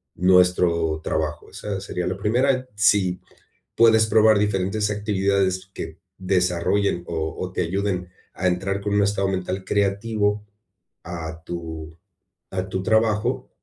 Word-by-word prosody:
nuestro 90 -3 +3
trabajo, 75 -1 -2
esa 100 -2 -5
sería 90 -3 -3
la 95 +1 -2
primera, 130 +5 +1
si 100 -4 +3 0.6
puedes 110 -1 +5
probar 110 0 +5
diferentes 105 +1 0
actividades 100 -2 0
que 80 - -7 0.2
desarrollen 90 0 +1
o 80 -1 -3
o 90 - -4
te 90 - -1
ayuden 90 0 -2 0.2
a 95 - -3
entrar 95 +2 0
con 100 0 -2
un 105 - +4
estado 100 -1 +1
mental 95 0 -3
creativo 105 +1 0 0.6
a 80 -1 -7
tu 80 -2 -7 0.5
a 95 0 -3
tu 95 0 -2
trabajo, 110 +4 +1
95 Hz, 130 wpm, -23 LUFS, 90-105 Hz, 0.6 s, puedes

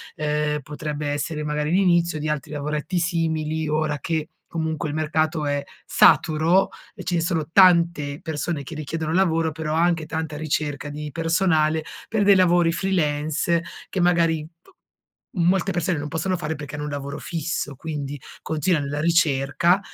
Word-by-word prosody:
ehm, 150 0 -1
potrebbe 150 +1 -5
essere 150 +2 -2
magari 150 0 -1
l'inizio 175 -3 +3
di 155 +1 -2
altri 150 0 -3
lavoretti 150 +4 -2
simili, 160 -2 -1
ora 150 0 0
che 160 +2 -2 0.2
comunque 160 -2 -2
il 145 - -4
mercato 155 0 0
è 145 0 -1 0.2
saturo 165 +5 +4 0.3
e - - -8
ce 180 - -2
ne 170 - +1
sono 165 -3 -1
tante 170 -6 +4
persone 155 -1 -3
che 150 - -9
richiedono 155 +1 -3
lavoro, 165 -3 +2
però 155 0 -3
anche 165 -1 +2
tanta 160 -2 -4
ricerca 150 -1 -2
di 150 0 -6
personale 165 -1 +2 0.2
per 220 -2 +1
dei 200 0 +7
lavori 175 -2 +4
freelance 165 -2 0 0.3
che 190 - -3
magari 170 -3 +3
p 165 - -34 0.7
molte 185 +3 +2
persone 175 0 0
non 145 +1 -4
possono 165 +5 -1
fare 160 -2 -3
perché 145 0 -8
hanno 150 0 -4
un 150 - -4
lavoro 140 0 -5
fisso, 165 -3 -3
quindi 145 -1 -5 0.2
continua 160 +1 0
nella 145 +1 -3
ricerca 165 +2 +3
155 Hz, 155 wpm, -23 LUFS, 150-170 Hz, 0.7 s, dei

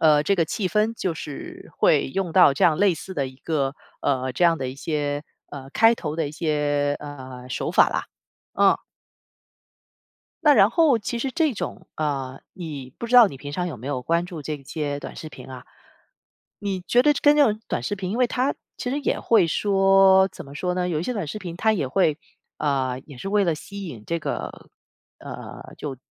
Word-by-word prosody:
呃， 150 -2 +5
这 200 - +3
个 170 -3 +2
气 185 +4 -2
氛 215 +3 +1
就 185 -6 -2
是 145 -1 -8
会 - - +3
用 180 +2 -2
到 180 -7 +7
这 - - +2
样 160 -3 +4
类 200 -3 +4
似 190 +4 -8
的 135 -3 -1
一 130 - -14
个 140 -3 -2 0.2
呃， 130 -2 0
这 175 - -2
样 165 -1 +4
的 130 -1 -3
一 130 - -6
些 145 0 -2 0.3
呃， 135 -1 -9
开 225 +1 +5
头 155 -6 -5
的 160 -3 -1
一 - - -10
些， 145 -2 0
呃， 130 -3 -9
手 130 - -2
法 - - +5
啦， - - -2 0.5
嗯。 - - +4 1.7
那 295 -2 +7
然 200 0 +6
后 310 -7 +4
其 235 +3 -4
实 265 +2 -2
这 310 +1 +1
种， - - -6
呃， 135 -4 -3
你 145 -8 -7
不 235 - -4
知 245 - -2
道 240 - +10
你 140 - -7
平 145 +2 -8
常 180 +2 -2
有 160 - -5
没 120 +4 -10
有 130 -3 -2
关 170 +4 +1
注 170 -4 -8
这 150 +1 -3
些 145 0 -4
短 - - -8
视 155 - -7
频 145 - -12
啊。 125 -1 -9 1.0
你 195 -3 -2
觉 245 +7 +3
得 295 - +5
跟 295 0 +6
那 295 - +6
种 215 -2 0
短 - - -2
视 205 - -2
频， 185 -1 -4
因 225 - -2
为 250 - +4
它 255 +3 0 0.2
其 250 - -3
实 285 - -1
也 280 - 0
会 210 -7 +4
说， 195 +1 +4
怎 - - -10
么 140 +1 -12
说 180 +4 -2
呢， 180 0 -1
有 160 -3 -1
一 - - -3
些 250 - -2
短 205 -8 -3
视 150 - -5
频 175 -4 -7
它 220 +3 +2
也 165 -10 -1
会， 155 0 +2 0.4
呃， 135 -4 0
也 140 -5 -12
是 195 - -5
为 205 -1 +3
了 165 -3 +1
吸 200 +4 -8
引 115 -9 -9
这 170 0 -1
个 - - -3
呃， - - -15 1.1
就 140 -3 -5
165 Hz, 230 characters per minute, -24 LUFS, 145-200 Hz, 1.7 s, 道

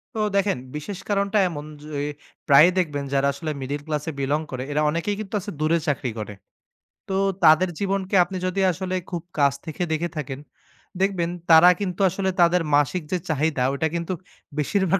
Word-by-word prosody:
তো - - -2 0.2
দেখেন, 200 -7 +2 0.2
বিশেষ 165 +6 -5
কারণটা 200 +1 +1
এমন 150 -3 -6 0.2
যে, - - -10 0.6
প্রায়ই 150 +5 +7
দেখবেন 150 -5 -1
যারা 140 0 +3
আসলে 155 +3 -4
মিডেল 140 +2 -3
ক্লাসে 150 +1 -2
belong 145 +3 0
করে, 130 -1 -4
এরা 150 - +1
অনেকেই 170 +6 -1
কিন্তু 215 -2 -7
আছে 205 - -6
দূরে 155 +2 +2
চাকরি 135 -4 -1
করে। 105 -1 -5 0.7
তো, 195 - -3 0.3
তাদের 160 +3 +6
জীবনকে 195 -1 -1
আপনি 185 +2 -6
যদি 185 +1 -1
আসলে 185 +1 -3 0.2
খুব 170 -2 -3
কাছ 140 -2 +4
থেকে 160 +1 -6
দেখে 165 +2 0
থাকেন, 135 -2 -4 0.6
দেখবেন 190 -3 +1 0.2
তারা 165 +2 +9
কিন্তু 185 -4 -3
আসলে 190 +1 -1
তাদের 175 +1 +4
মাসিক 145 +5 +2
যে 185 - +2
চাহিদা 155 -2 0
ঐটা 150 +3 0
কিন্তু 170 +2 -2 0.4
বেশিরভাগ 190 +5 +1
165 Hz, 170 wpm, -24 LUFS, 145-185 Hz, 0.7 s, তারা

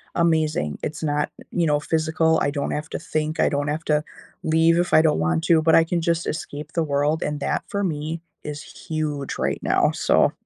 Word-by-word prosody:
amazing. 155 - +1
It's 155 +1 -4
not, 150 -1 0 0.2
you 170 -1 +1
know, 150 -1 +2
physical, 160 +1 +1
I 140 - +1
don't 140 -1 -2
have 150 +2 -3
to - - -4
think, 155 0 -2
I - - +4
don't 145 0 -1
have 155 +2 -2
to 150 0 +2 0.4
leave 160 +1 +3
if 175 +1 0
I 155 - +8
don't 155 - +2
want 80 0 +1
to, 165 -2 +4
but 160 0 +4
I 165 - +7
can 170 +1 -1
just 170 0 0
escape 150 0 -5
the 165 - +1
world, 145 +1 0
and 150 0 -2
that - - -1
for 200 -3 -2
me 160 -1 -3 0.2
is 150 -1 -5
huge 150 -3 -4
right - - -1
now, - - +3
so - - +3
155 Hz, 210 wpm, -23 LUFS, 150-165 Hz, 0.4 s, I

